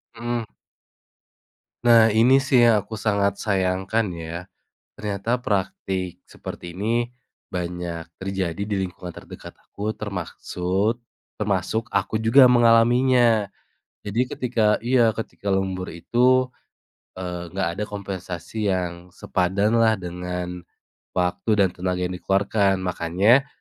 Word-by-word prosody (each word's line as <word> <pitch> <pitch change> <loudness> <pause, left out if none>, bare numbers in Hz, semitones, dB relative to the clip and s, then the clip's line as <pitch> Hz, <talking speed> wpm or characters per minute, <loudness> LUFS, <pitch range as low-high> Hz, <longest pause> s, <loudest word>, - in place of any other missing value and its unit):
Mhm. 120 0 -2 1.4
Nah, 115 -2 +6
ini 125 +5 +5
sih 135 -2 +3
yang 115 - +5
aku 110 +1 -7
sangat 100 -2 +1
sayangkan 95 +2 0
ya. 85 0 -6 0.6
Ternyata 105 +3 -2
praktik 95 -2 -2
seperti 85 -1 -9
ini 115 +6 -1 0.4
banyak 85 -2 -4
terjadi 95 -1 -3
di 100 0 -2
lingkungan 90 -1 -9
terdekat - - -11
aku 105 +2 -5
termaksud 95 +1 -2 0.4
termasuk 105 +2 -1
aku - - 0
juga 115 +4 +6
mengalaminya. 120 -2 +4 0.6
Jadi 105 +4 -1
ketika 115 -4 +1
iya 120 -1 +3
ketika 100 -2 -4
lembur 95 -1 -1
itu, 125 +9 +2 0.7
eee, 90 -2 -6
nggak 95 -3 0
ada 105 - 0
kompensasi 95 0 -5
yang 90 -2 -2
sepadan 100 +5 +1
lah 110 -1 +4
dengan 90 -1 -5 0.6
waktu 90 +4 0
dan 100 -3 +3
tenaga 90 0 -3
yang 90 0 -2
dikeluarkan. 100 0 +1
Makanya 95 +9 +3
100 Hz, 110 wpm, -23 LUFS, 90-115 Hz, 1.4 s, Nah